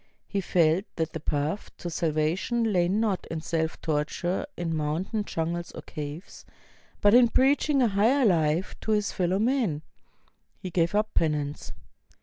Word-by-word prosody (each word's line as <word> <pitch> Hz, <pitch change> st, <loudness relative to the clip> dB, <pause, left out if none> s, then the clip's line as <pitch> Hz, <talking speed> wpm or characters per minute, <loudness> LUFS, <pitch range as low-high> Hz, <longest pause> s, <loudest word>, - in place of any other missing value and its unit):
He 200 Hz, -, -1 dB
felt 175 Hz, +1 st, +2 dB
that 160 Hz, -1 st, -2 dB
the 160 Hz, -, -4 dB
path 150 Hz, +6 st, -2 dB
to 175 Hz, -, -5 dB
salvation 170 Hz, +9 st, 0 dB
lay 175 Hz, -2 st, +3 dB
not 205 Hz, -1 st, 0 dB
in 160 Hz, -, -3 dB
self 160 Hz, -1 st, -2 dB
torture 160 Hz, -, -1 dB
in 165 Hz, -2 st, -2 dB
mountain 165 Hz, +8 st, -2 dB
jungles 170 Hz, 0 st, -3 dB
or -, -, -8 dB
caves, 150 Hz, +3 st, -8 dB, 0.6 s
but 205 Hz, 0 st, +5 dB
in 245 Hz, 0 st, +7 dB
preach 270 Hz, +6 st, +3 dB
ing 275 Hz, -3 st, +4 dB
a -, -, +4 dB
higher 225 Hz, +7 st, +3 dB
life 165 Hz, -2 st, +2 dB
to 220 Hz, -, 0 dB
his 210 Hz, -1 st, +1 dB
fellow 185 Hz, 0 st, 0 dB
men. 220 Hz, -, 0 dB, 0.7 s
He 185 Hz, -, -7 dB
gave 170 Hz, +2 st, +1 dB
up 215 Hz, +1 st, +1 dB
penance. 150 Hz, -2 st, -1 dB
175 Hz, 155 wpm, -27 LUFS, 160-210 Hz, 0.7 s, in